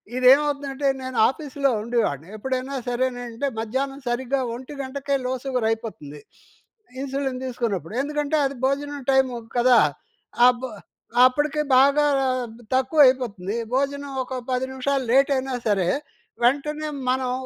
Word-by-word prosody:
ఇది 255 0 -1
ఏమవుతుందంటే 280 -1 -1
నేను 260 -1 -5
ఆఫీస్‌లో 280 -1 -1
ఉండేవాన్ని. 210 - -1
ఎప్పుడైనా 260 +3 -3
సరేనంటే 245 +1 -2
మధ్యాహ్నం 270 +5 -3
సరిగ్గా 260 +2 -1
1 260 +4 -9
గంటకే 275 +1 -2
లో 255 - 0
సుగర్ 250 -4 0
అయిపోతుంది. 150 -11 -6 0.8
ఇన్సులిన్ 270 -1 -3
తీసుకున్నప్పుడు. 220 - -3
ఎందుకంటే 295 +1 -1
అది 275 0 -2
భోజనం 285 +1 -1
టైము 265 -2 +3 0.2
కదా! 245 0 +6 0.7
అపు 250 +1 +1 0.6
అప్పడికి 295 +3 +1 0.2
బాగా 280 +3 +5 0.7
తక్కువ 265 +4 +1
అయిపోతుంది 220 -6 -1 0.2
భోజనం 280 +1 -1
ఒక 255 - -8 0.2
10 255 0 0
నిమిషాలు 265 +1 -1
లేట్ 275 +2 +5
అయినా 265 0 -3
సరే. 195 -4 +2 0.6
వెంటనే 300 +4 +1 0.2
మనం 255 -1 0
260 Hz, 120 wpm, -23 LUFS, 245-280 Hz, 0.8 s, కదా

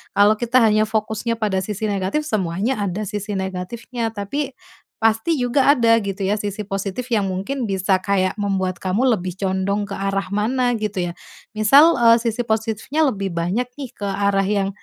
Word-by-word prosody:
Kalau 205 +1 +5
kita 240 +1 +3
hanya 215 -1 +4
fokusnya 220 +1 -1
pada 205 -4 0
sisi 210 +1 -5
negatif, 200 +9 -1
semuanya 205 - -1
ada 200 +2 -2
sisi 205 +1 -4
negatifnya. 220 +5 -4
Tapi, 255 +7 -3 0.5
pasti 225 +8 +2
juga 260 +3 +3
ada 230 -4 +4
gitu 200 -1 -5
ya 205 +3 +1
sisi 205 0 -4
positif 195 +5 -4
yang 215 -4 +1
mungkin 230 +8 -3
bisa 190 -1 +1
kayak 190 0 0
membuat 190 -3 -1
kamu 200 +9 +1
lebih 180 0 -5
condong 195 +1 -1
ke 200 - -5
arah 195 -1 -2
mana, 245 +4 0
gitu 210 -3 -2
ya. - - -12 0.4
Misal, 275 +9 +6
eee, 230 0 +6
sisi 235 0 -2
positifnya 225 +7 0
lebih 195 -5 -4
banyak 175 +9 -1
nih 270 - -5
ke 205 - -4
arah 195 0 +1
yang 200 -1 0
210 Hz, 170 wpm, -21 LUFS, 195-230 Hz, 0.5 s, Misal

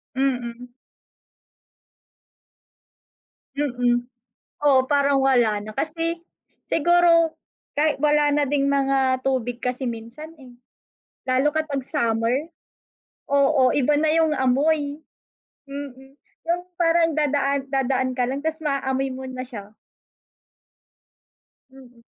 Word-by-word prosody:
Mm. 245 -2 -2 2.8
Mm. 245 -3 0 0.6
Oo, 265 -2 +5
parang 280 -1 +3
wala 235 -6 +2
na 215 - -8
kasi 330 +6 -2 0.5
siguro 335 0 +4 0.5
kay 305 0 +3
wala 295 -1 +3
na 295 - +2
ding 280 -1 +1
mga 270 -2 +1
tubig 245 -2 -2
kasi 250 +1 -2
minsan, 240 +8 -7
eh. 255 - -13 0.8
Lalo 260 +3 +2
kapag 310 -3 -2
summer. 235 0 0 0.8
Oo, 280 -2 +3
iba 290 +1 +2
na 310 - +2
yung 325 -1 +3
amoy. 285 +2 +1 0.7
Mm, 270 -1 -9 0.3
yung 345 +1 0 0.2
parang 330 -1 +3
dadaan 280 -2 0
dadaan 260 -1 0
ka 250 - +2
lang 265 +3 -3
tas 320 0 -2
maaamoy 270 -2 -1
mo 260 0 -7
na 255 0 -5
siya. 210 -4 -10 2.0
Mm. 245 -3 -17
270 Hz, 105 wpm, -23 LUFS, 255-295 Hz, 2.8 s, Oo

